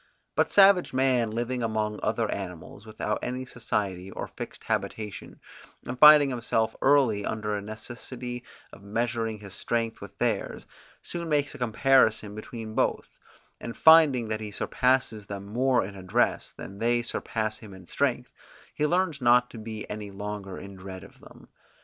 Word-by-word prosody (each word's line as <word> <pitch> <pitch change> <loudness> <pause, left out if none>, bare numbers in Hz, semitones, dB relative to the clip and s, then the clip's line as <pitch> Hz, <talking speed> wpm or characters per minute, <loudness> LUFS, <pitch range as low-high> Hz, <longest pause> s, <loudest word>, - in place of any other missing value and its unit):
But - - +1
savage 195 -5 +6
man 130 -3 +2
living 120 +3 -2
among 110 -2 -1
other 115 +1 0
animals 95 +2 -7
without 105 0 -3
any 125 +1 -3
society 100 -6 -3
or - - -6
fixed - - -8
habitation, 105 -2 -4 0.5
and 125 +1 -5
finding 150 -1 +9
himself 115 -2 0
early 130 -7 +4
under 105 0 -2
a 100 - -3
necessity 120 +3 -6 0.3
of 100 - -13
measuring 115 +1 -2
his 100 -2 -7
strength 115 0 -2
with 100 - -11
theirs, - - -1 0.4
soon 170 -1 -5
makes 145 -2 +1
a - - -11
comparison 115 -3 +3
between 110 +1 -7
both, - - 0 0.5
and 115 - -7
finding 155 -7 +6
that 110 0 -2
he 105 - -5
surpasses 115 -1 0
them 100 -1 -6
more 125 +3 +1
in 100 +1 -9
address, 95 +6 0
than 100 +1 -10
they 120 +1 +2
surpass 110 -2 -3
him 110 -3 -12
in 95 -2 -12
strength, - - -1 0.4
he 150 - 0
learns 175 -4 0
not 125 0 +4
to 115 - -9
be 110 -1 -7
any 105 -1 -6
longer 100 -1 -6
in 100 +1 -9
dread 95 0 -9
of - - -16
them. - - -16
115 Hz, 160 wpm, -27 LUFS, 105-125 Hz, 0.5 s, finding